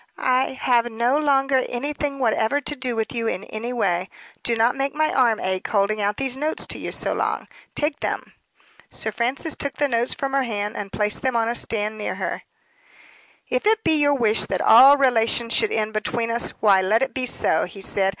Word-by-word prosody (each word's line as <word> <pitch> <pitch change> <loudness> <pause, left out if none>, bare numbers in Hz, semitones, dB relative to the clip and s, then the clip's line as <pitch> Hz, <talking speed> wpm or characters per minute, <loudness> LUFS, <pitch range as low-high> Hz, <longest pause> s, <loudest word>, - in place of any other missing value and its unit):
"I 260 +1 +1
have 240 -3 +1
no 235 +4 +1
longer 275 -3 +2
anything 285 +2 -3
whatever 230 +1 +1
to 295 +1 -5
do 255 -3 -3
with 225 -1 -2
you 230 -2 -2
in 195 - -2
any 225 +3 -6
way. 195 -6 -1 0.3
Do 235 - 0
not 230 +3 +2
make 275 +1 -2
my 310 0 +1
arm 235 -4 +3
ache, 185 0 -2
holding 210 +1 +1
out 205 +1 0
these 265 -2 -2
notes 300 +3 -2
to - - -5
you - - -5
so - - -3
long! - - -2 0.3
Take 295 0 -1
them!" - - -4 0.6
Sir 220 - -3
Francis 250 +8 -2
took 280 - -4
the 290 - +1
notes 240 -1 0
from 270 -1 -3
her 275 - +3
hand 210 -4 -3
and 200 -2 -6
placed 210 0 -1
them 260 -2 -1
on 225 -1 +2
a 235 - 0
stand 215 -2 -3
near 210 - -3
to - - -7
her. - - -4 1.1
"If - - -1
it 440 0 +3
be 315 -3 +2
your 285 0 +3
wish 225 -4 +2
that - - -2
all 270 +5 +8
relations 235 -3 +2
should 435 - +1
end 220 0 -1
between 230 +2 -2
us, 235 +1 -1
why, 200 -3 +4
let 215 +6 +2
it - - -3
be 255 -1 -2
so," 160 -8 +1
he 190 +2 -11
said. 195 0 +1
240 Hz, 215 wpm, -22 LUFS, 215-275 Hz, 1.1 s, all